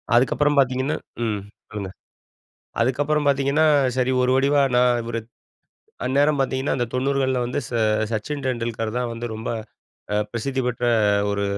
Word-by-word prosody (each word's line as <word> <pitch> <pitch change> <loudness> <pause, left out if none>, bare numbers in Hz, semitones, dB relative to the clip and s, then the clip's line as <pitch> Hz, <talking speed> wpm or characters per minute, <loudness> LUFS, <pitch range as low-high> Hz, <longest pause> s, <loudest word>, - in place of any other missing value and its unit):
அதுக்கப்புறம் 145 +4 +3
பார்த்தீங்கன்னா 130 +2 +1 0.3
ம் 105 -3 -1 0.3
சொல்லுங்க. 100 -3 -5 0.9
அதுக்கப்புறம் 145 +4 +1
பார்த்தீங்கன்னா, 140 +2 +3 0.3
சரி. 130 0 +1
ஒரு 125 0 +2
முடிவா 140 +2 +3
நான் 125 0 +5
இவரு 115 0 -3 0.9
அந்நேரம் 140 +3 +2
பார்த்தீங்கன்னா, 130 0 0
அந்த 120 -2 0
90கள்ல 130 0 +1
வந்து 125 - -2
ச - - -12 0.4
"சச்சின் 135 +6 -3
டெண்டுல்கர்" 115 -3 -2
தான் 125 -1 -2
வந்து 115 +1 -5
ரொம்ப 110 +1 -6 0.7
அ - - +1 0.2
பிரசித்தி 130 +3 -2
பெற்ற 120 0 -2 0.5
ஒரு 100 0 -1
130 Hz, 135 wpm, -23 LUFS, 120-140 Hz, 0.9 s, நான்